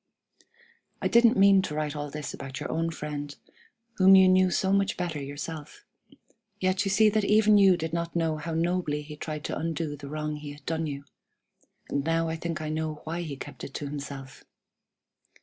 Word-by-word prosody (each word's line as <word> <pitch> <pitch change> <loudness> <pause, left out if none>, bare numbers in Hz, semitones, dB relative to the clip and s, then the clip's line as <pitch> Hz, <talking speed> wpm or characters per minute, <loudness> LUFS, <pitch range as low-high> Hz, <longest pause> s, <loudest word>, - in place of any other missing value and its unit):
"I - - 0
didn't 235 -2 +5
mean 195 0 +6
to 150 -5 -4
write 150 -1 -2
all 145 0 -4
this 150 0 -6
about 135 0 -7
your - - -4
own 165 +1 0
friend, 145 -2 -5 0.6
whom 190 0 +8
you 190 0 +7
knew 185 0 +5
so 190 +2 +1
much 200 0 +1
better 170 -5 -3
yourself, 150 - -7 0.7
yet 185 +1 +1
you - - 0
see 215 +3 +5
that 215 0 +1
even 210 0 +5
you 190 -3 +6
did 160 -1 -4
not 170 0 -3
know 165 -2 0
how 160 +1 -4
nobly 165 -3 0
he 150 +1 -9
tried 150 0 -5
to - - -3
undo 160 -2 -2
the 140 -1 -9
wrong 150 0 -3
he 145 -1 -8
had 145 0 -16
done 160 -1 -1
you; 140 -1 -5 0.8
and 140 - -1
now 165 +1 +1
I 160 - -2
think 165 -1 -4
I 155 - -3
know 155 -1 -3
why 165 +2 -3
he 155 -5 -5
kept - - -9
it 135 - -8
to 145 - -4
himself. 140 -2 -7
160 Hz, 200 wpm, -27 LUFS, 150-185 Hz, 0.8 s, whom